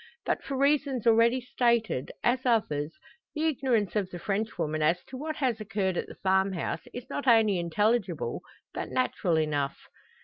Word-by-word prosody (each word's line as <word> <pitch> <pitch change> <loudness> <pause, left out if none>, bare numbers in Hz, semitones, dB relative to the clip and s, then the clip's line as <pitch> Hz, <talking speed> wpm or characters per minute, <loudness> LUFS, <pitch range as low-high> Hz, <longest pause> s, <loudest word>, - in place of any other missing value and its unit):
But - - -1
for 275 -1 -4
reasons 280 -3 +1
already 230 +2 +5
stated, 235 - 0
as 255 +2 +2
others, 165 - 0 0.4
the 310 +1 0
ignorance 250 - +1
of 200 -3 0
the 180 - -7
Frenchwoman 195 -6 -2
as 165 +4 +2
to 260 - -8
what 310 +4 -4
has 250 -7 -1
occurred 200 -3 -1
at - - -2
the - - -10
farmhouse, 190 -3 0
is 245 +1 -8
not 280 0 -4
only 220 -5 +5
intelligible, 190 0 0 0.3
but - - -4
natural 185 -9 0
enough. 145 -3 0
220 Hz, 160 wpm, -28 LUFS, 180-255 Hz, 0.4 s, already